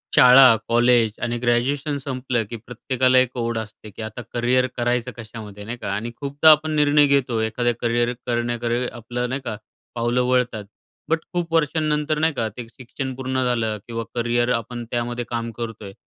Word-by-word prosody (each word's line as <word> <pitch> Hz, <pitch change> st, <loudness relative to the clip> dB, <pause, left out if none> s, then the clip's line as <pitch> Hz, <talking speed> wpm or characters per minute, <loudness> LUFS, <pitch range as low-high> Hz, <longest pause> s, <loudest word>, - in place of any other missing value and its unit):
शाळा, 125 Hz, -1 st, +8 dB
कॉलेज 120 Hz, -1 st, +4 dB
आणि 120 Hz, 0 st, -1 dB
ग्रॅज्युएशन 135 Hz, +5 st, 0 dB
संपलं 130 Hz, -4 st, -2 dB
की 120 Hz, -, -5 dB
प्रत्येकाला 125 Hz, +3 st, 0 dB
एक 130 Hz, 0 st, +2 dB
ओढ 115 Hz, -1 st, -1 dB
असते 110 Hz, -1 st, -7 dB
की 105 Hz, -, -10 dB
आता 110 Hz, +2 st, -6 dB
करियर 125 Hz, +2 st, +2 dB
करायचं 120 Hz, 0 st, 0 dB
कशामध्ये, 110 Hz, -3 st, -9 dB
नाही 115 Hz, +4 st, -6 dB
का? -, -, -7 dB
आणि 115 Hz, +4 st, -3 dB
खूपदा 145 Hz, +3 st, +5 dB
आपण 155 Hz, +1 st, +3 dB
निर्णय 145 Hz, 0 st, +4 dB
घेतो 130 Hz, -5 st, +1 dB
एखाद्या 120 Hz, +2 st, 0 dB
करियर 120 Hz, 0 st, +1 dB
करण्याकडे 120 Hz, 0 st, -1 dB
आपलं, 120 Hz, +1 st, -4 dB
नाही 130 Hz, +2 st, -3 dB
का, -, -, -3 dB, 0.4 s
पावलं 120 Hz, +1 st, +1 dB
वळतात. 125 Hz, -4 st, 0 dB, 0.4 s
बट 165 Hz, 0 st, +2 dB
खूप 170 Hz, -2 st, -2 dB
वर्षांनंतर, 155 Hz, -1 st, +1 dB
नाही 160 Hz, +1 st, +2 dB
का, 115 Hz, -5 st, -1 dB
ते 120 Hz, -2 st, -6 dB
शिक्षण 130 Hz, +2 st, -6 dB
पूर्ण 130 Hz, 0 st, -2 dB
झालं 115 Hz, -3 st, 0 dB
किंवा 115 Hz, -1 st, -4 dB
करिअर 120 Hz, 0 st, +1 dB
आपण 120 Hz, +1 st, -4 dB
त्यामध्ये 120 Hz, 0 st, -2 dB
काम 115 Hz, -1 st, -3 dB
करतोय. 110 Hz, -4 st, -6 dB
120 Hz, 170 wpm, -22 LUFS, 115-130 Hz, 0.4 s, शाळा